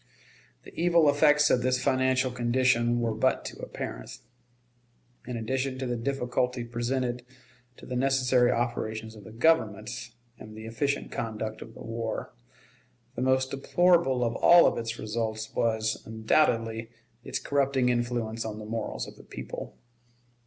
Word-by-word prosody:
The - - -13
evil 170 -2 +3
effects 150 0 +4
of 125 - +3
this 130 0 +1
financial 130 -1 +2
condition 120 -1 +2
were 115 -1 0
but 130 +4 +1
too - - -7
apparent. - - -6 1.1
In 125 -2 -3
addition 130 +3 -2
to 130 - -3
the 120 -1 -1
difficulty 125 0 -1
presented 120 +1 -2 0.5
to - - -12
the 125 - -5
necessary 130 -1 +3
operations 110 -2 -2
of 105 -3 -13
the 110 - -10
Government, 120 -3 +1 0.3
and 110 0 -11
the 110 - -8
efficient 140 +5 -2
conduct 110 -1 -4
of 115 - -10
the - - -10
war, 115 -1 -4 0.8
the - - -5
most 130 0 +2
deplorable 150 -2 +3
of 115 -1 -1
all 175 0 +6
its 115 0 -4
results 110 0 -3
was, 110 -1 0
undoubtedly, 115 0 +1 0.3
its - - -3
corrupting 135 -3 +1
influence 120 -2 -1
on 110 -1 -5
the 110 - -8
morals 110 0 -3
of - - -12
the - - -14
people. - - -8
120 Hz, 145 wpm, -28 LUFS, 115-130 Hz, 1.1 s, all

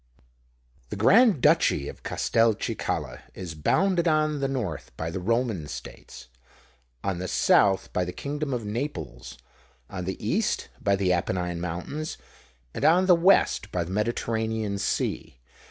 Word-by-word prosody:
The - - -4
Grand 200 - +5
Duchy 70 - +3
of - - -9
Castelcicala 115 -2 0 0.2
is 90 -3 -6
bounded 175 - +1
on 155 -2 +2
the 135 - 0
north 115 - -4
by 80 +1 -3
the 95 - -4
Roman 110 -4 -1
States, 65 - -10 0.8
on 95 -3 -2
the 95 - -3
south 95 +2 +3
by 90 - +1
the 90 - -4
kingdom 145 +6 -4
of 120 -4 -3
Naples, 110 - -5 0.5
on 90 -2 -5
the 95 - -3
east - - -1
by 100 0 +2
the 95 -2 +1
Apennine 90 -1 -2
Mountains, 90 - -4 0.6
and - - -5
on 180 +3 +5
the 185 - +6
west 170 - +3
by 90 - -1
the 85 - -8
Mediterranean 110 -1 -1
Sea. 100 - -2
105 Hz, 140 wpm, -26 LUFS, 90-145 Hz, 0.8 s, the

